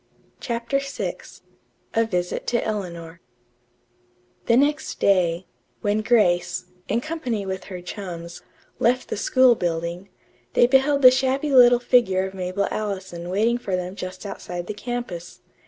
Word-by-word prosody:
CHAPTER 235 Hz, +3 st, -1 dB
VI 275 Hz, 0 st, -4 dB, 0.8 s
A 225 Hz, 0 st, +3 dB
VISIT 180 Hz, -4 st, -2 dB
TO 240 Hz, -, +1 dB
ELEANOR 170 Hz, -5 st, -5 dB, 1.3 s
The 235 Hz, -, +5 dB
next 295 Hz, +3 st, +1 dB
day, 180 Hz, -2 st, +2 dB, 0.4 s
when 205 Hz, +1 st, +1 dB
Grace, 210 Hz, -8 st, +2 dB, 0.2 s
in 235 Hz, -, 0 dB
company 255 Hz, -9 st, -3 dB
with 190 Hz, -1 st, -4 dB
her 185 Hz, -3 st, -7 dB
chums, 175 Hz, -3 st, -7 dB, 0.4 s
left 250 Hz, +2 st, +1 dB
the -, -, -2 dB
school 255 Hz, +3 st, +4 dB
building, 170 Hz, 0 st, -3 dB, 0.4 s
they -, -, +5 dB
beheld 270 Hz, +2 st, +3 dB
the 255 Hz, -, +11 dB
shabby 265 Hz, +3 st, 0 dB
little 245 Hz, -1 st, +8 dB
figure 235 Hz, -6 st, +2 dB
of 190 Hz, -, -6 dB
Mabel 185 Hz, +1 st, -2 dB
Allison 190 Hz, -5 st, -4 dB
waiting 225 Hz, +6 st, +1 dB
for 195 Hz, -6 st, -2 dB
them 180 Hz, 0 st, -4 dB
just 185 Hz, 0 st, -7 dB
outside 175 Hz, -3 st, -6 dB
the 210 Hz, -, -4 dB
campus. 210 Hz, -6 st, -6 dB
205 Hz, 140 wpm, -23 LUFS, 180-245 Hz, 1.3 s, the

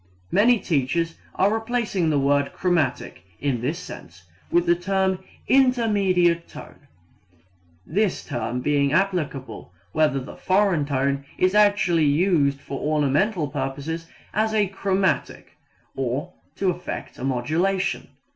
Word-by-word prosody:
Many 235 Hz, +4 st, +5 dB
teachers 165 Hz, +1 st, 0 dB, 0.2 s
are 200 Hz, +3 st, +3 dB
replacing 225 Hz, -6 st, -1 dB
the 150 Hz, -, +2 dB
word 140 Hz, 0 st, +1 dB
chromatic 155 Hz, -, -1 dB, 0.2 s
in 130 Hz, -4 st, -1 dB
this 145 Hz, +7 st, -1 dB
sense 95 Hz, -, -10 dB, 0.3 s
with 175 Hz, 0 st, +2 dB
the 170 Hz, -, +5 dB
term 190 Hz, +1 st, 0 dB, 0.3 s
intermediate 200 Hz, -10 st, +3 dB
tone, -, -, -13 dB, 1.0 s
this 200 Hz, +3 st, 0 dB
term 120 Hz, +1 st, -3 dB
being 140 Hz, 0 st, +1 dB
applicable 150 Hz, -, -1 dB, 0.2 s
whether 150 Hz, 0 st, +2 dB
the 130 Hz, -, -9 dB
foreign 185 Hz, -5 st, +2 dB
tone 140 Hz, 0 st, 0 dB
is 185 Hz, +1 st, +2 dB
actually 205 Hz, -6 st, +4 dB
used 145 Hz, -2 st, +2 dB
for 140 Hz, -1 st, -6 dB
ornamental 155 Hz, +4 st, +1 dB
purposes 145 Hz, +4 st, -4 dB, 0.3 s
as 220 Hz, +1 st, +1 dB
a 210 Hz, -1 st, +3 dB
chromatic, 195 Hz, -2 st, -1 dB, 0.4 s
or 135 Hz, +7 st, -3 dB, 0.2 s
to 190 Hz, -2 st, +1 dB
effect 175 Hz, +1 st, -7 dB
a -, -, -6 dB
modulation. 165 Hz, +10 st, 0 dB
170 Hz, 120 wpm, -23 LUFS, 140-195 Hz, 1.0 s, Many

